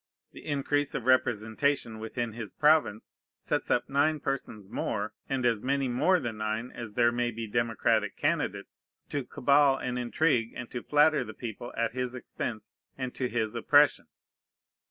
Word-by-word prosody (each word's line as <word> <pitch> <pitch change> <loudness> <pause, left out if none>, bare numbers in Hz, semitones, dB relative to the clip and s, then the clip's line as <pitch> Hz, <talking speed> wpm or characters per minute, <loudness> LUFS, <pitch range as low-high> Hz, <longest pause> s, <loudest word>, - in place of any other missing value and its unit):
The - - -12
increase 145 0 -1
of 120 - -3
representation 120 0 +1
within 115 +1 -4
his 110 -4 -7
province 150 -8 +2 0.2
sets - - -2
up - - +1
nine 145 +3 +2
persons 110 -8 -4
more, 105 +1 -3 0.2
and 130 -2 -1
as 115 -3 +2
many 135 0 0
more 180 +10 +3
than 120 -7 -4
nine 110 +3 -2
as 110 -3 -8
there 120 -1 +4
may 120 0 0
be 115 0 -5
democratic 115 -1 0
candidates, - - -2 0.3
to 145 - -2
cabal 140 +2 +3
and 125 -1 -3
intrigue 120 -1 +1
and 120 -1 -7
to 125 - -4
flatter 150 +2 +3
the - - -9
people 120 0 -6
at 115 0 0
his 125 0 -3
expense 110 -3 -6 0.2
and 130 -2 -4
to 125 -2 -2
his 110 -2 -1
oppression. 145 +5 +4
120 Hz, 160 wpm, -29 LUFS, 115-140 Hz, 0.3 s, there